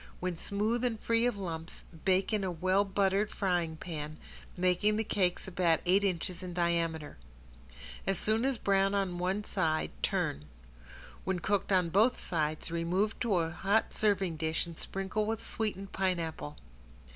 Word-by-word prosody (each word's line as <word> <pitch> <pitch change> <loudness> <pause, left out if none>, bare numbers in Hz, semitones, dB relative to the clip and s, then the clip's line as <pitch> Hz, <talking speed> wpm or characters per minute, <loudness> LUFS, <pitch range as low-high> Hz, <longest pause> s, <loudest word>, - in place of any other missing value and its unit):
When 180 -1 -2
smooth 215 +7 0
and 235 -3 0
free 230 +2 +2
from 240 - -6
lumps, 165 -3 -5 0.2
bake 190 +3 +2
in 210 -2 +1
a 190 - 0
well 185 +3 +2
buttered 200 +1 +1
frying 175 -5 0
pan, 155 -2 -5 0.4
making 185 +4 +2
the 220 - +1
cakes 185 -4 0
about 175 -3 +2
eight 190 +3 +4
inches 185 -1 -1
in 180 -2 -6
diameter. 170 -3 0 0.9
As 195 - +2
soon 220 +2 +1
as 270 -1 +1
brown 195 -1 +2
on 185 -3 0
one 190 +4 0
side 155 -5 0
turn. 75 +2 0 0.8
When 190 -1 0
cooked 200 +3 0
on 180 -3 +3
both 215 +8 +4
sides 155 -1 -1
remove 180 +6 0
to 230 -5 +1
a 165 -2 +1
hot 195 +5 +1
serving 195 -6 +1
dish 160 +2 0
and 170 -1 -9
sprinkle 195 +5 -2
with 225 0 -2
sweetened 200 -3 -3
pineapple. 165 - -2
185 Hz, 155 wpm, -31 LUFS, 170-205 Hz, 0.9 s, eight